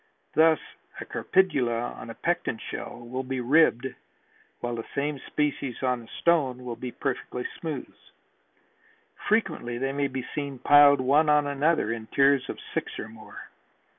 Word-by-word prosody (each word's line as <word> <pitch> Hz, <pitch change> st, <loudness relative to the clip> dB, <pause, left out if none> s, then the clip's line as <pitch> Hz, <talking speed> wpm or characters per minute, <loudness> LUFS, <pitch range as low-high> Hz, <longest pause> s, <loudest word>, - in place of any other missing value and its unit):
Thus 160 Hz, +1 st, +5 dB, 0.4 s
a -, -, -6 dB
Crepidula 120 Hz, -11 st, +1 dB
on -, -, -9 dB
a -, -, -7 dB
Pecten -, -, -1 dB
shell -, -, -7 dB
will 130 Hz, +2 st, -3 dB
be 130 Hz, 0 st, -4 dB
ribbed 130 Hz, -1 st, +4 dB, 0.7 s
while 120 Hz, 0 st, -3 dB
the 115 Hz, -, -5 dB
same 145 Hz, 0 st, -1 dB
species 140 Hz, -4 st, -2 dB
on 125 Hz, -2 st, +1 dB
a 115 Hz, -, -14 dB
stone 135 Hz, -7 st, +1 dB
will 120 Hz, -1 st, -4 dB
be 125 Hz, +1 st, -6 dB
perfectly 125 Hz, -2 st, -3 dB
smooth. 160 Hz, -3 st, -5 dB, 1.4 s
Frequently 160 Hz, -, 0 dB
they 135 Hz, +2 st, -1 dB
may 140 Hz, 0 st, 0 dB
be 130 Hz, -2 st, -5 dB
seen 140 Hz, -2 st, -4 dB
piled 145 Hz, +1 st, +6 dB
one 145 Hz, +4 st, +4 dB
upon 150 Hz, -1 st, +4 dB
another 145 Hz, -3 st, +1 dB
in 110 Hz, -1 st, -7 dB
tiers 140 Hz, 0 st, +3 dB
of -, -, -4 dB, 0.2 s
six -, -, -3 dB
or 110 Hz, -, -6 dB
more. 110 Hz, -1 st, -11 dB
135 Hz, 155 wpm, -27 LUFS, 125-150 Hz, 1.4 s, piled